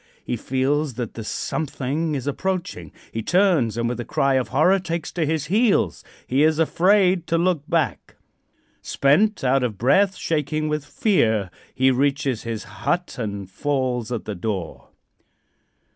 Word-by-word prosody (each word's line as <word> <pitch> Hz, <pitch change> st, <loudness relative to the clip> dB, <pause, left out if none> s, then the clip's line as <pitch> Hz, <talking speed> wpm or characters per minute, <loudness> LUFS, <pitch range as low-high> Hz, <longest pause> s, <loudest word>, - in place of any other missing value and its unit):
He -, -, -1 dB
feels 135 Hz, +3 st, -1 dB
that 120 Hz, -2 st, -4 dB
the 115 Hz, -, -6 dB
something 145 Hz, +6 st, -2 dB
is 135 Hz, -, -4 dB
approaching. 145 Hz, -, -3 dB, 0.2 s
He 115 Hz, -, -3 dB
turns, 170 Hz, -, +2 dB
and 115 Hz, 0 st, 0 dB
with 120 Hz, +1 st, -3 dB
a -, -, -2 dB
cry 135 Hz, +3 st, +1 dB
of 130 Hz, -3 st, +1 dB
horror 175 Hz, -, +3 dB
takes 170 Hz, -3 st, -4 dB
to 165 Hz, -3 st, -1 dB
his 155 Hz, -1 st, -1 dB
heels. 195 Hz, -, +2 dB, 0.2 s
He 130 Hz, +3 st, +1 dB
is 155 Hz, 0 st, +4 dB
afraid 180 Hz, +2 st, +3 dB
to 165 Hz, -, +1 dB
look 170 Hz, -3 st, 0 dB
back. 165 Hz, -2 st, -1 dB, 0.7 s
Spent, 170 Hz, +10 st, +2 dB
out 135 Hz, +1 st, +3 dB
of 115 Hz, -5 st, -2 dB
breath, 190 Hz, -, +3 dB
shaking 155 Hz, -2 st, -1 dB
with 150 Hz, -1 st, -2 dB
fear, 130 Hz, -, +1 dB, 0.2 s
he 130 Hz, 0 st, +4 dB
reaches 135 Hz, -2 st, 0 dB
his 115 Hz, -2 st, -5 dB
hut 175 Hz, 0 st, -3 dB
and 100 Hz, -4 st, -4 dB
falls 125 Hz, +1 st, -2 dB
at 120 Hz, -, -3 dB
the 105 Hz, -, -4 dB
door. 95 Hz, -2 st, -4 dB
140 Hz, 155 wpm, -23 LUFS, 120-165 Hz, 0.7 s, is